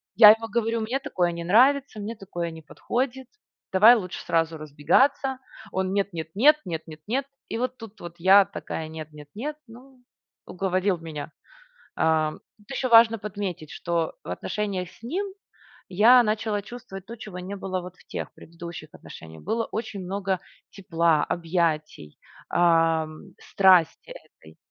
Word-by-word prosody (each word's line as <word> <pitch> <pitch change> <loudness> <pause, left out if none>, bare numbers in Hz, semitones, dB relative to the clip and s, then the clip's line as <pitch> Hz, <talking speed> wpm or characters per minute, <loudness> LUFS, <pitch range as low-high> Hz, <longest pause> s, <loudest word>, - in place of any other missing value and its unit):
Я 215 -2 +10
ему 225 +1 0
говорю: 230 0 -1
"Мне 235 +5 -1
такое 185 -12 -1
не 170 0 -6
нравится, 255 +6 +3
мне 210 +3 -5
такое 175 -5 -5
не 160 0 -10
подходит. 255 - -3 0.4
Давай 215 +6 +8
лучше 185 -6 -4
сразу 165 0 0
разбегаться". 255 - +1 0.3
Он: 190 0 -1
"Нет 200 -1 0
нет 160 -2 -5
нет 295 +8 +6
нет 165 -3 -4
нет 155 -1 -10
нет". 265 +5 -1 0.2
И - - -3
вот 255 +1 -2
тут 220 -2 -12
вот 170 0 -8
я 190 +3 +7
такая: 160 -3 -6
"Нет, 155 -1 -8
нет, 150 -1 -12
нет". 290 +8 -4
Ну, 250 +3 -16 0.4
уговорил 185 0 0
меня. 155 -2 -7 0.6
Ам. 155 -1 +1 0.2
Тут 210 +2 -25
еще 265 -1 -1
важно 230 -1 +7
подметить, 195 -6 -5
что 170 -2 -2
в - - -9
отношениях 185 - -3
с - - -21
ним 350 - -2 0.7
я 235 +7 +7
начала 215 -1 -1
чувствовать 210 -4 -10
то, 235 - -8
чего 210 -5 -9
не 185 +3 -6
было 190 -1 -3
вот 180 0 -10
в - - -23
тех - - -6
предыдущих 170 -1 -10
отношениях. 80 0 -12
Было 225 +3 -1
очень 220 -2 -5
много 190 0 -2 0.3
тепла, 165 -5 +1
объятий, 160 - -2 0.3
ам, 165 +1 +1
страсти 185 -4 +3
этой. 80 0 -16
190 Hz, 155 wpm, -25 LUFS, 165-225 Hz, 0.7 s, Я